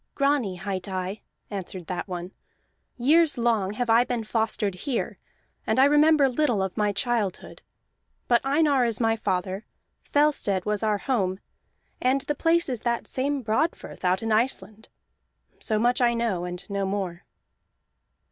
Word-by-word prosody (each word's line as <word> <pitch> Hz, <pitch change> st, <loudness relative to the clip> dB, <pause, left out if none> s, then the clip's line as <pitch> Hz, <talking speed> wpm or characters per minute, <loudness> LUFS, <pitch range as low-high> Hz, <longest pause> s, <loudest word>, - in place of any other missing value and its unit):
"Grani 275 Hz, -9 st, +1 dB
hight 190 Hz, 0 st, -4 dB
I," 190 Hz, +2 st, -4 dB, 0.3 s
answered 185 Hz, -3 st, -6 dB
that 180 Hz, +2 st, -4 dB
one. 180 Hz, 0 st, -5 dB, 0.7 s
"Years 300 Hz, +5 st, +3 dB
long 225 Hz, -5 st, +1 dB
have 245 Hz, +3 st, -2 dB
I 230 Hz, +1 st, +5 dB
been 245 Hz, -2 st, -3 dB
fostered 220 Hz, -2 st, -1 dB
here, 240 Hz, +7 st, -3 dB, 0.5 s
and -, -, +1 dB
I 265 Hz, -, +7 dB
remember 295 Hz, 0 st, +5 dB
little 250 Hz, -6 st, +1 dB
of 190 Hz, -1 st, -4 dB
my 210 Hz, -1 st, +1 dB
childhood. 205 Hz, -2 st, -2 dB, 0.7 s
But 240 Hz, -1 st, +3 dB
Einar 280 Hz, -1 st, +3 dB
is 230 Hz, -3 st, 0 dB
my 225 Hz, -1 st, +2 dB
father, 190 Hz, -1 st, -2 dB, 0.4 s
Fellstead 285 Hz, -11 st, +1 dB
was 210 Hz, -1 st, 0 dB
our 215 Hz, -2 st, +1 dB
home, 195 Hz, -6 st, -1 dB, 0.6 s
and 260 Hz, +2 st, +2 dB
the 295 Hz, -, -2 dB
place 335 Hz, +3 st, +2 dB
is 250 Hz, -5 st, -3 dB
that 235 Hz, -1 st, -1 dB
same 275 Hz, +1 st, -1 dB
Broadfirth 225 Hz, +10 st, -2 dB
out 185 Hz, +3 st, +1 dB
in 225 Hz, -, -1 dB
Iceland. 220 Hz, -1 st, 0 dB, 0.7 s
So 215 Hz, -, -1 dB
much 240 Hz, +3 st, +2 dB
I 240 Hz, -1 st, +3 dB
know 220 Hz, -7 st, -1 dB
and 180 Hz, 0 st, -7 dB
no 200 Hz, -2 st, -2 dB
more." 190 Hz, -3 st, -3 dB
225 Hz, 150 wpm, -25 LUFS, 195-260 Hz, 0.7 s, I